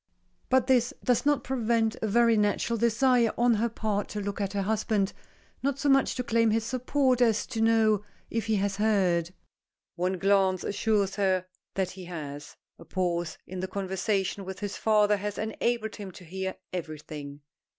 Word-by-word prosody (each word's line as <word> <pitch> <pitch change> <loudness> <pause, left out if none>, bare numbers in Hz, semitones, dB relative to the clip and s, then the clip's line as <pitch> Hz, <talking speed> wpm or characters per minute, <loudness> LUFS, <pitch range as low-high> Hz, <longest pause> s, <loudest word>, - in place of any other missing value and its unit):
But 260 -1 +4
this 250 -2 +2
does 250 +3 +2
not 290 -1 +2
prevent 230 -3 +1
a 220 - 0
very 230 +2 +4
natural 210 +2 +1
desire 235 +1 +3
on 240 0 +4
her 230 +2 +1
part 210 -2 -2
to 210 - -4
look 200 0 -3
at 195 0 -2
her 200 -1 0
husband, 210 -1 0 0.5
not 280 0 0
so 285 0 0
much 270 -1 +3
to 250 - -2
claim 230 -1 +2
his 225 +1 +1
support 255 +1 +1
as 225 -3 +3
to 230 -3 -4
know 220 -2 +3 0.3
if 225 -2 -2
he 220 - +2
has 195 -1 0
heard. 185 -6 +2 0.7
One 180 +2 0
glance 190 -1 +2
assures 205 -1 0
her 190 -2 +1 0.3
that 190 -2 0
he 185 -1 -9
has. 150 -4 -7 0.2
A - - -11
pause 175 -2 -2
in 185 0 -7
the 185 - -2
conversation 195 0 -1
with 190 0 -7
his 205 -1 -3
father 210 -1 +3
has 205 +1 -4
enabled 220 0 -2
him 200 -2 -7
to 180 - -12
hear 190 +3 -4 0.2
everything. 150 -4 -6
210 Hz, 175 wpm, -28 LUFS, 190-230 Hz, 0.7 s, But